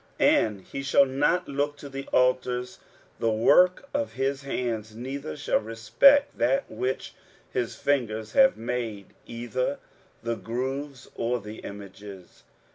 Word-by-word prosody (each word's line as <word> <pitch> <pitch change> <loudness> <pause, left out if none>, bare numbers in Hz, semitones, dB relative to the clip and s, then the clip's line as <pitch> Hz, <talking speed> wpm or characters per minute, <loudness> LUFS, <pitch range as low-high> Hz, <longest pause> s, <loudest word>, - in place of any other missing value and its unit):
23:017:008 - - +6
And 105 -3 -2
he 135 - -6
shall 140 0 +5
not 145 +7 +1
look 145 +1 -1
to 145 - -9
the 135 0 -7
altars, 125 -1 +1 0.4
the 115 - +1
work 180 - +4
of 285 0 -1
his 135 +1 -1
hands, 115 -5 -3
neither 125 - -5
shall - - +1
respect 275 - +4
that 275 -1 +2
which 130 +1 -3 0.4
his 120 -2 -2
fingers 115 -6 -1
have 270 -1 +5
made, 115 -4 -4
either 120 +2 -2 0.5
the 115 0 -1
groves, 130 +4 -4
or 120 +1 -1
the 105 +1 -9
images. 100 -2 -10
125 Hz, 135 wpm, -26 LUFS, 115-140 Hz, 0.5 s, 23:017:008